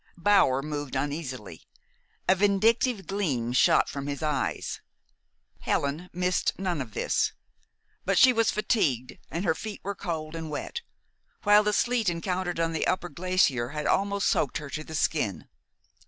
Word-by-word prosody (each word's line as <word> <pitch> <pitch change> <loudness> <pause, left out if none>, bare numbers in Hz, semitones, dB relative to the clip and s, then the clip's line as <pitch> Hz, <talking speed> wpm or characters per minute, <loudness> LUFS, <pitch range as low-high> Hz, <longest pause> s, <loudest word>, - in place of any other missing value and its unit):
Bower 165 -8 +4
moved 145 -2 -4
uneasily. 135 - -4 0.6
A - - +6
vindictive 205 +2 +2
gleam 145 - -1
shot 130 - +4
from 140 0 -5
his 145 +2 -4
eyes. 150 -3 -2 0.8
Helen 150 +6 -1
missed 180 +1 0
none 180 -5 -1
of 110 -5 -8
this. - - +1 0.7
But - - +1
she 255 -1 +7
was 230 -2 +2
fatigued, 140 - 0
and 170 +4 -3
her 160 - +3
feet 215 +5 -7
were 200 - -2
cold 165 -5 -4
and 160 -1 -5
wet, 150 - -4 0.6
while 205 0 +6
the 210 0 +1
sleet 235 0 +1
encountered 175 0 -2
on 165 0 0
the 160 - 0
upper 180 -1 0
glacier 165 -8 +1
had 150 +1 -4
almost 200 0 +1
soaked 140 - +1
her 145 -2 -8
to 155 - -4
the 160 - -8
skin. 145 - 0
165 Hz, 155 wpm, -27 LUFS, 145-200 Hz, 0.8 s, she